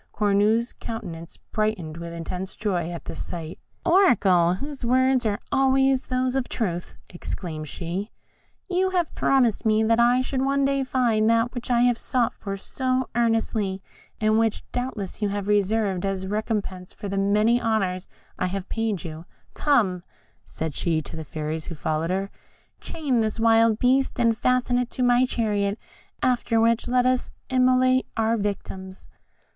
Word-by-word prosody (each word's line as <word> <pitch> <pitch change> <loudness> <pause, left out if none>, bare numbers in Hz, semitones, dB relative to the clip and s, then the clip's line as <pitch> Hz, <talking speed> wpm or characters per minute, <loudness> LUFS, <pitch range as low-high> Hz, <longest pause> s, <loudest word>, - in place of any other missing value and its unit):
Cornue's 210 +3 +2
countenance 175 -8 -7
brightened 215 -8 -3
with 170 0 -6
intense 180 +3 -5
joy 180 -6 -1
at 170 -1 -7
this - - -5
sight. 165 -2 -7 0.3
"Oracle, 195 - +4
whose 280 +6 -7
words 255 0 +3
are 205 -1 -1
always 270 0 +3
those 255 0 0
of 265 -2 -1
truth," 175 -7 -3 0.2
exclaimed 165 -3 -6
she, 180 +7 -4 0.6
"you 375 0 +1
have 355 -4 -1
promised 245 -6 +2
me 220 -1 +3
that 230 +1 +3
I 245 +2 +4
should 260 0 -2
one 275 +1 +2
day 275 0 +1
find 235 -4 +2
that 230 +1 +2
which 245 -1 -6
I 240 -1 +3
have 245 -1 +3
sought 250 -4 0
for 195 -1 -6
so 255 +5 -2
earnestly, 225 -4 0 0.4
and 215 0 +3
which 225 -2 0
doubtless 235 -6 -4
you 205 - +1
have 200 0 -3
reserved 205 -2 +1
as 195 -1 -2
a 190 - -5
recompense 205 -4 -3
for 205 - -7
the 195 - -3
many 210 +4 +3
honours 195 -5 0 0.3
I 185 - +1
have 195 +1 -5
paid 225 -3 -1
to 175 - -6
you. 160 +1 -8 0.3
Come," 215 -12 +2 0.4
said 160 -2 -5
she 160 0 0
to - - -9
the 160 - -5
fairies 155 +1 -4
who 170 - -6
followed 155 +2 -2
her, 195 +2 -2 0.5
"chain 275 -7 -1
this 220 +1 -2
wild 225 -1 +4
beast, 260 +2 +2
and 230 -2 +3
fasten 250 +1 +1
it 250 -1 -2
to 255 - -3
my 245 +1 +4
chariot, 205 -4 0 0.5
after 240 -2 +2
which 230 +1 +2
let 250 0 +2
us 255 0 +1 0.2
immolate 255 0 +3
our 225 0 +2
victims." 195 -2 -5
220 Hz, 165 wpm, -24 LUFS, 190-250 Hz, 0.6 s, Oracle